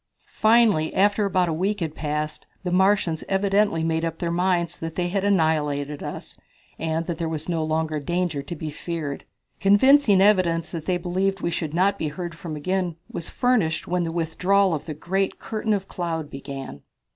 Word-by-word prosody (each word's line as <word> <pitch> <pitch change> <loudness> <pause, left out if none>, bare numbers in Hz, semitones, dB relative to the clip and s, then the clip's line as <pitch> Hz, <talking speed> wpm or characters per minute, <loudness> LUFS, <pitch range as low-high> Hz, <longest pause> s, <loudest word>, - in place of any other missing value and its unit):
Finally, 215 -8 +3
after 205 +2 +3
about 185 -2 +2
a 165 - 0
week 195 +6 -1
had 160 -4 -3
passed, 150 0 -3 0.2
the 180 - -2
Martians 190 -3 +2
evidently 195 -3 +2
made 160 0 0
up 165 -1 -2
their 170 -1 -2
minds 175 -1 0
that 165 0 -5
they 175 -1 -1
had 195 +1 -1
annihilated 150 -6 +1
us, - - -7 0.4
and 160 +1 -1
that 170 -1 -4
there 165 -1 -1
was 160 -1 -4
no 165 -3 0
longer 155 0 -1
danger 170 0 -1
to 170 +5 -7
be 155 -1 -5
feared. 155 -2 -5 0.3
Convincing 205 +2 +5
evidence 185 -5 +3
that 160 -2 -6
they 180 -1 +2
believed 185 +2 -1
we 170 - -1
should 160 -2 -3
not 195 +3 +2
be 160 - -1
heard 170 +3 -5
from 165 -2 -7
again 180 +2 -1 0.2
was 170 - -4
furnished 245 -11 +1
when 180 0 0
the 165 - -2
withdrawal 180 +3 +2
of 155 - -4
the 155 - -4
great 190 +5 -1
curtain 220 0 -3
of 195 -2 0
cloud 165 -4 -4
began. 135 - -7
170 Hz, 185 wpm, -24 LUFS, 160-195 Hz, 0.4 s, Convincing